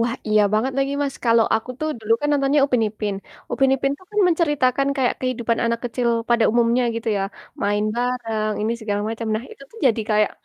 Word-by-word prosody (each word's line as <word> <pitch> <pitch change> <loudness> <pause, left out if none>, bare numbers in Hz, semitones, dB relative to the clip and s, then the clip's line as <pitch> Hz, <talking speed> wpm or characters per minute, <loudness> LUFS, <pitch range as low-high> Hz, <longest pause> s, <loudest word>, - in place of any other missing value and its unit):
Wah 235 +1 0
iya 215 0 +4
banget 230 +5 +1
lagi, 275 0 0
Mas. 275 -1 -2
Kalo 230 -1 +4 0.2
aku 225 +3 -6
tuh 310 - -1
dulu 220 0 0
kan 295 - -1
nontonnya 285 0 +2
Upin 250 -4 +1
Ipin, 210 -1 -4 0.4
Upin 270 -1 +2
Ipin 275 +1 0
tuh 370 - -20
kan 420 0 +1
menceritakan 290 -6 +1
kayak 260 -3 +1
kehidupan 240 -3 -1
anak 230 0 0
kecil 245 0 -1 0.2
pada 235 -1 +4
umumnya 235 +1 +3
gitu 230 0 -3
ya, 195 - 0 0.4
main 205 +1 +1
bareng, 230 -3 -1
ini, 220 +2 0
segala 205 -2 -2
macem. 225 0 -4
Nah 220 - -2
itu - - -13
tuh 455 - -14
jadi 230 -3 +2
kayak, 215 -1 +3
235 Hz, 205 wpm, -22 LUFS, 220-270 Hz, 0.4 s, iya